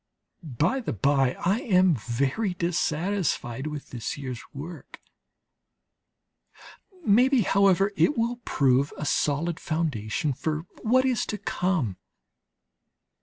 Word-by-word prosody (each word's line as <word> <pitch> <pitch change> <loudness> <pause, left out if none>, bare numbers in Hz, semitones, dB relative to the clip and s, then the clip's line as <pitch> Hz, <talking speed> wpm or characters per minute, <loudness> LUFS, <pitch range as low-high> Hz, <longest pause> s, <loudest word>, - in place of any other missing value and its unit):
By 160 - 0
the 245 - -3
bye, 135 +3 +2
I 195 +5 +2
am 185 -6 +4
very 140 - -1
dissatisfied 170 - -1
with 150 -2 -7
this 120 -3 -4
year's 130 -4 -5
work; 160 +5 -9 2.1
maybe, 250 +5 +5
however, 195 0 +3
it 295 - +2
will 235 +1 0
prove 140 - +1
a 150 - -4
sound 155 +4 0
foundation 150 -5 -1
for 155 +4 -3 0.2
what 255 +4 +3
is 255 -3 +1
to 210 - -3
come. 170 - -1
165 Hz, 110 wpm, -26 LUFS, 135-200 Hz, 2.1 s, maybe